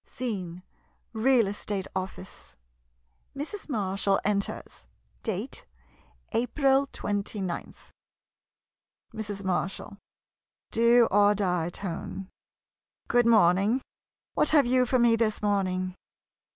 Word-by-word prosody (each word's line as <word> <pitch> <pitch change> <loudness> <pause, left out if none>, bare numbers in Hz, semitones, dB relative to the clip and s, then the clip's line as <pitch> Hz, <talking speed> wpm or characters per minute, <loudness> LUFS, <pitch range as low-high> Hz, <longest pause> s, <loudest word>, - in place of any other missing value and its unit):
Scene 185 -8 -5 0.3
— - - -43
Real 255 -4 +5
Estate 200 -1 -3
Office. 190 0 -7 0.8
Mrs. 315 +6 -5
Marshall 195 -4 0
enters. 200 - -3 0.3
Date - - -4 0.3
— - - -30 0.3
"April 270 +3 +2
29th. 200 -5 -4 1.2
Mrs. 205 -2 -4
Marshall 190 +2 -3 0.7
[Do 235 0 +5
or 205 +1 +5
die 180 -4 0
tone.] 190 +1 -6 0.8
Good 240 -1 +4
morning. 205 +2 +4 0.5
What - - +2
have 295 -4 +5
you 250 +1 +3
for 255 - +2
me 235 -1 +5
this 215 -2 0
morning? 185 -3 0
205 Hz, 100 wpm, -27 LUFS, 190-235 Hz, 1.2 s, Real